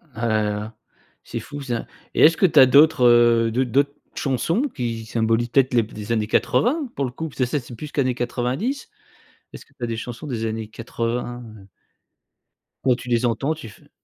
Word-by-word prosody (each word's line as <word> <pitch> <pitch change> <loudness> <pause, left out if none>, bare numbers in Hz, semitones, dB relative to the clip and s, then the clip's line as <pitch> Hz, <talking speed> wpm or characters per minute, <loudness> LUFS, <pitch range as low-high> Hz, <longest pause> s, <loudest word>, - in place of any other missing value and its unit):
Ah 115 +1 -2
là 110 -1 +2
là, 105 +1 -4 0.5
c'est - - -5
fou 145 0 -8
ça 120 -4 -3 0.3
et - - +1
est-ce 165 +2 +6
que - - +4
tu 160 -4 +5
as 130 - +10
d'autres, 140 +1 +5
heu, 120 -1 +5
d'autres 125 +1 0
d'autres 140 +2 +2 0.2
chansons, 165 - 0
qui 115 - -4
symbolisent 115 +1 0
peut-être 130 +1 +2
les 120 -2 +4
b 110 - -13
des 105 +1 -6
années 110 -2 0
80 270 - +1
pour 140 - -1
le 125 - -4
coup? 160 +6 -5
Parce - - -17
que 130 - +3
ça, 140 +4 -1
c'est 120 0 -11
plus 150 +5 -8
qu'années 130 -3 +1
90. 130 - -2 0.6
Est-ce - - -10
que - - -30
tu 125 - -8
as - - 0
des 115 -1 -3
chansons 120 +5 -7
des 115 -5 -3
années 110 0 -3
80? 120 +2 -4 0.2
Heu 95 - -17 1.2
quand 130 -2 +3
tu 125 0 -9
les 120 0 +2
entends, 135 +6 0
tu 155 -8 -9
fais - - -19
120 Hz, 215 wpm, -22 LUFS, 115-140 Hz, 1.2 s, as